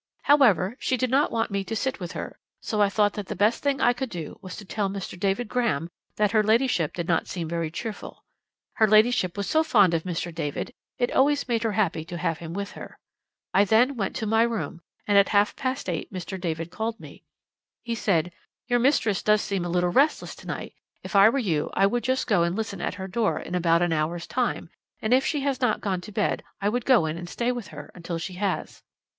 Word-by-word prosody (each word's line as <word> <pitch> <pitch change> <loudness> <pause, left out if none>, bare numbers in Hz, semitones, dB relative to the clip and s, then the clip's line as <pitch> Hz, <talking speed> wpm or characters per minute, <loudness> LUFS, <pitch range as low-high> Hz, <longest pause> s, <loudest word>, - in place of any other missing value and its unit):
"'However, 235 -8 +4
she 255 - 0
did 255 0 -1
not 275 +3 +3
want 225 -2 -1
me 200 0 -1
to 225 - -4
sit 265 +2 -2
with 175 -3 -6
her, - - -6 0.2
so 215 -3 -1
I 205 - +4
thought 205 0 +2
that 205 -3 -6
the - - -4
best 210 +5 +2
thing 280 -1 0
I 245 - +4
could 255 +1 -4
do 170 -6 -7
was 185 -1 -8
to 210 - -9
tell 200 +1 -2
Mr. 195 -1 -5
David 195 +6 -1
Graham 190 - 0 0.3
that 210 -1 +2
her 215 - +4
ladyship 220 - +2
did 170 -1 -3
not 170 - +1
seem 170 -3 -4
very 165 -1 -2
cheerful. 215 +6 -7 0.5
Her 220 - +5
ladyship 215 -4 +3
was 200 - -2
so 315 - +3
fond 205 - +4
of 165 - +1
Mr. 175 -1 -4
David; 160 - -4 0.2
it 245 -1 0
always 285 +1 +2
made 235 -2 0
her 225 -2 0
happy 190 -6 0
to 175 0 -6
have 165 -2 -1
him 165 -1 -7
with 200 0 -4
her. - - -10 0.6
I 195 - +5
then 230 +7 +3
went 195 -5 -2
to 220 - -2
my 220 +1 +3
room, 230 -7 -1 0.2
and 205 -1 +5
at 200 - +3
half 205 0 +3
past 260 -3 -3
eight 170 -4 -3
Mr. 190 0 -6
David 165 -1 -3
called 225 +2 -3
me. - - -12 0.6
He 235 - -3
said: 180 -6 +1 0.4
"Your 245 -1 +2
mistress 235 -6 +2
does 210 0 +3
seem 195 -3 -2
a 175 - -3
little 175 0 +1
restless 280 - +2
to - - -13
night. - - -5 0.3
If - - -7
I 200 +2 +8
were 275 - -1
you 175 - 0
I 195 - +4
would 240 +4 0
just 260 0 0
go 205 -6 +2
and 170 +1 +1
listen 215 -4 -4
at - - -2
her 190 -1 -6
door 215 +3 0
in - - -8
about 170 -1 +3
an 175 -2 +1
hour's 165 +2 -1
time, 245 +5 -2 0.3
and 220 +3 +1
if 260 +1 +4
she 295 - 0
has 270 -2 -1
not 245 -4 +2
gone 190 -3 -2
to 210 - -10
bed 210 0 0 0.2
I 205 - +1
would 240 +2 -2
go 245 -11 +5
in 160 +1 -3
and 175 0 -7
stay 240 +6 -1
with 240 -4 -5
her 150 -1 -10
until 170 -1 -5
she 165 +3 -5
has." 190 +1 -3
205 Hz, 235 wpm, -25 LUFS, 175-235 Hz, 0.6 s, I